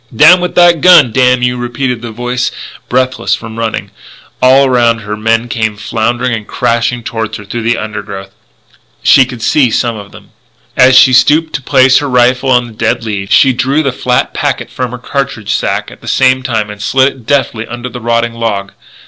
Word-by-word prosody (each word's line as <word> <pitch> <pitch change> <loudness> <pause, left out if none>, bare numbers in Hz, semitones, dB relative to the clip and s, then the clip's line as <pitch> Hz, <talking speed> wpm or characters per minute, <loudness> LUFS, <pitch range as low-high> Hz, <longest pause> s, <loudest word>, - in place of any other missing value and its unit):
"Down 175 +9 +6
with 180 - -3
that 175 -3 +4
gun, 170 -9 +6
damn 125 +1 +2
you!" 125 0 0
repeated 120 0 -3
the 120 - -7
voice, 125 +2 -3 0.4
breathless 130 0 0
from 115 0 -9
running. 115 -1 -4 0.5
All 130 +2 +5
around 120 -3 +1
her 105 0 -5
men 115 +2 0
came 110 -3 -3
floundering 115 +3 -2
and 110 -2 -5
crashing 120 +1 -1
toward 115 -3 -4
her 105 - -9
through 115 +4 -5
the 115 +1 0
undergrowth. 100 -2 -7 0.7
She 135 - +5
could 125 -3 -9
see 135 -5 +2
some 115 +1 -1
of 100 -1 -10
them. - - -16 0.4
As 130 +1 +5
she 130 - +6
stooped 155 +5 +3
to 135 - -3
place 130 0 +3
her 145 - -4
rifle 125 +1 +2
on 125 -1 +3
the 115 - -12
dead 115 +1 -1
leaves, 100 -3 -5
she 135 -2 +4
drew 135 +5 0
the 135 - 0
flat 125 0 -1
packet - - -3
from 125 -1 -4
her 125 - -7
cartridge 125 -4 -3
sack 115 - -2
at - - -15
the - - -13
same 130 0 +2
time 110 -5 -3
and 105 0 -11
slid 130 +5 +2
it 125 -4 -18
deftly 120 -5 -1
under 120 +1 -7
a 125 - -8
rotting 115 0 -1
log. 105 -4 -3
120 Hz, 200 wpm, -11 LUFS, 115-130 Hz, 0.7 s, Down